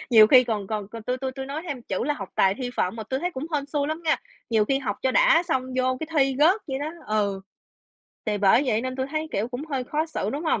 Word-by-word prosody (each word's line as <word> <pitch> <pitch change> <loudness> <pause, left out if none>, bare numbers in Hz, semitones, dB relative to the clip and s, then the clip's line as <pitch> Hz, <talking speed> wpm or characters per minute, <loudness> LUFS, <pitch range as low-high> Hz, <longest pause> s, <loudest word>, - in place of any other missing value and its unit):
nhiều 220 -2 +9
khi 255 +1 +7
còn 210 -4 -2
còn 210 -2 -4
còn 230 +1 -8
tui 250 +3 -1
tui 260 0 -3
tui 265 0 -6
nói 295 +4 -4
thêm 260 -5 -4
chữ 190 +1 -2
là 295 +2 0
học 195 -6 -7
tài 190 0 +3
thi 250 +2 -4
phận 185 +5 0
mà 220 - -4
tui 260 +5 -3
thấy 355 +2 -1
cũng 275 +2 -5
hên 285 -1 -1
xui 285 0 -1
lắm 315 +2 -3
nghe. 315 - +3 0.3
Nhiều 220 -2 +3
khi 270 +4 +1
học 270 - -3
cho 260 - +2
đã - - +5
xong 265 -7 -1
vô 255 0 +1
cái 315 - -3
thi 270 -1 +3
rớt 360 +8 +5
vậy 265 0 -2
đó 295 +2 -3 0.2
ừ. 205 -2 0 0.9
Thì 210 -1 0
bởi 205 +6 +5
vậy 225 -3 +2
nên 255 +1 -4
tui 260 0 -1
thấy 310 +1 -2
kiểu 210 +4 -1
cũng 250 +4 -5
hơi 265 -3 -1
khó 305 +5 -1
xử, 215 -10 -3
đúng 295 +7 -4
hông? 315 - +1
260 Hz, 285 wpm, -25 LUFS, 220-290 Hz, 0.9 s, nhiều